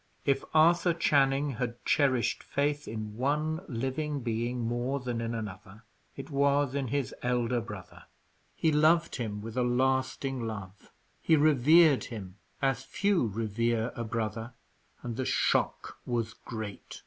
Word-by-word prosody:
If 135 -1 +2
Arthur 170 +2 +5
Channing 140 -3 +2
had 120 -1 -1
cherished 130 -5 +2
faith 145 +1 -1
in 110 -1 -6
one 150 +5 0
living 135 +4 -2
being 120 +1 -2
more 120 +4 -1
than 120 -2 -3
in 115 0 -2
another, 105 0 -7 0.3
it 135 +3 -8
was 140 -1 +2
in 140 -2 -1
his 140 +1 -2
elder 125 -1 0
brother. 105 -5 -10 0.5
He 160 - +2
loved 155 +3 +3
him 105 -4 -4
with 110 +1 -7
a 130 - +1
lasting 130 0 0
love, 100 -3 -8 0.3
he 160 - +4
revered 155 +1 +5
him 100 -5 -8 0.3
as 135 -2 +1
few 200 - +1
revere 115 +2 -1
a 120 - -3
brother; 115 +1 -3 0.5
and 120 -2 -4
the 130 - -1
shock - - 0
was 115 -3 -1
great. 110 -3 -8
125 Hz, 140 wpm, -29 LUFS, 115-140 Hz, 0.5 s, Arthur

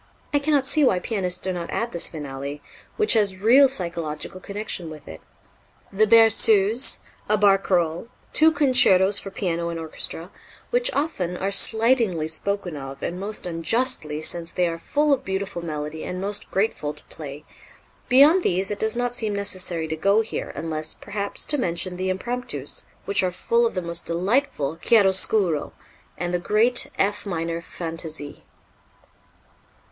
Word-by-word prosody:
I 290 - +4
cannot 285 -2 +1
see 300 +3 +2
why 220 -9 +4
pianists 180 -2 -2
do 185 +1 -3
not 170 -1 -5
add 235 - -2
this 170 - 0
finale, 140 -2 -6 0.4
which 430 -1 +4
has 205 -4 +2
real 245 +8 +6
psychological 170 - -3
connection 200 -4 -4
with 155 -2 -11
it. 80 0 -10 0.7
The 215 +2 +3
"Berceuse," 225 +1 +4 0.3
a 215 - +4
"Barcarolle," 195 -3 +2 0.3
two 320 +1 +6
"Concertos 210 - +4
for 195 - -7
Piano 170 -3 -2
and 165 -1 -4
Orchestra," 165 +2 -4 0.4
which - - +2
often 190 - -2
are 195 +2 -2
slightingly 220 -5 +2
spoken 180 +1 -3
of, 135 -1 -8
and 175 +1 -3
most 205 +1 -5
unjustly, 165 - -1
since 170 +1 -2
they 180 -1 +1
are 165 0 -4
full 295 - +1
of 270 -1 -1
beautiful 190 -3 -4
melody 150 -1 -5
and 180 - -5
most 200 +2 -3
grateful 190 -7 -1
to - - -17
play 145 -1 -10 0.6
beyond 285 +8 +6
these 190 - +1
it 205 - -4
does 220 +1 0
not 245 0 -1
seem 220 -4 -1
necessary 185 -5 -1
to 160 - -3
go 200 +7 +3
here, 225 - -5
unless, 155 0 -4
perhaps, 200 -1 -5
to 295 - +1
mention 180 -3 -2
the 185 +1 -2
Impromptus, 190 - -4 0.2
which 200 - +2
are 185 - +1
full 230 +6 +1
of 225 - -7
the 185 - -2
most 170 0 -2
delightful 170 - 0
chiaroscuro, 190 -5 +2 0.4
and 175 +1 -3
the 175 - +1
great 225 +7 +4
F 205 +1 0
minor 165 -2 -3
"Fantaisie." 165 -3 -5
190 Hz, 155 wpm, -23 LUFS, 165-225 Hz, 0.7 s, real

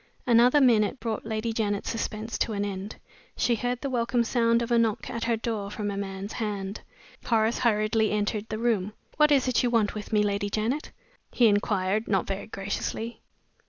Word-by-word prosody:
Another 245 +4 +5
minute 240 -2 +3
brought 225 -1 -3
Lady 220 +1 -2
Janet's 205 -3 -1
suspense 220 0 -4
to 225 - 0
an 205 0 -1
end. 200 +1 -5 0.4
She 240 - +2
heard 245 +2 -2
the 275 - -2
welcome 240 0 +1
sound 230 0 +2
of 235 - -5
a 235 - +5
knock 225 -2 0
at 230 0 -3
her 230 -1 +1
door 220 -3 -3
from 205 0 -3
a - - -4
man's 195 +1 -5
hand. 205 -2 -4 0.4
Horace 225 0 +1
hurriedly 220 -1 +2
entered 210 +1 -1
the 215 - -3
room. 215 -4 0 0.2
"What 300 0 +5
is 270 -2 +4
it 255 - +2
you 245 - +1
want 225 -3 +2
with 210 +1 -7
me, 210 -1 +3
Lady 205 0 -1
Janet?" 225 +8 -2 0.4
he 245 - +3
inquired, 205 0 +1
not 195 -3 +1
very 195 0 -4
graciously. 220 +3 -4
220 Hz, 190 wpm, -27 LUFS, 205-235 Hz, 0.4 s, Another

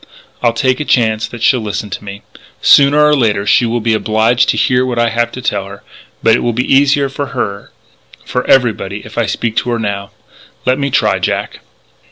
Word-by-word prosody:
I'll 120 -2 +2
take 130 +1 0
a - - -1
chance 110 -5 +1
that 120 -2 -9
she'll 125 -1 +3
listen 105 -1 -5
to 90 - -6
me.... 100 0 -9 0.4
Sooner 145 +1 +5
or 150 0 +4
later 110 -6 0
she 115 +3 +3
will 120 +1 -2
be 115 0 +1
obliged 110 +2 +1
to - - +1
hear 125 0 +2
what 125 -2 -3
I 120 0 +2
have 120 +1 -1
to 125 - -8
tell 100 -4 -2
her.... 100 0 -12 0.4
But 115 - +5
it - - 0
will 120 - -1
be 125 +4 0
easier 140 +1 +3
for 140 +1 -5
her 100 -3 -4 0.5
for 125 - -2
everybody 105 -6 +1
if 110 +2 -6
I 115 - 0
speak 115 -1 -2
to 125 - 0
her 120 - 0
now. 100 -3 -4 0.6
Let 130 +2 +1
me 140 0 -1
try, 105 -7 +1
Jack." - - -3
115 Hz, 215 wpm, -14 LUFS, 110-130 Hz, 0.6 s, Sooner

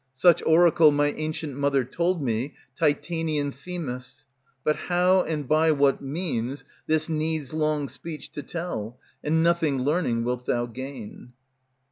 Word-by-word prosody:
Such 170 +5 +5
oracle 160 -1 +6
my 145 0 +2
ancient 155 -2 -4
Mother 140 -1 +2
told 170 +5 -1
me, 120 +3 -2 0.2
Titanian 155 -1 0
Themis; 140 -3 -6 0.4
But 150 - +2
how 180 +1 +3
and 150 -5 -3
by 155 +2 +4
what 140 -2 +3
means, 135 -3 -3 0.2
this 155 0 +1
needs 155 -3 -1
long 155 -2 0
speech 160 +2 -8
To 145 - -5
tell, 135 -8 -5 0.3
and 160 +2 +2
nothing, 165 -6 +2
learning, 140 -6 +1
wilt 125 +1 -3
thou 120 0 +1
gain. 125 -1 -8
150 Hz, 135 wpm, -26 LUFS, 135-160 Hz, 0.4 s, oracle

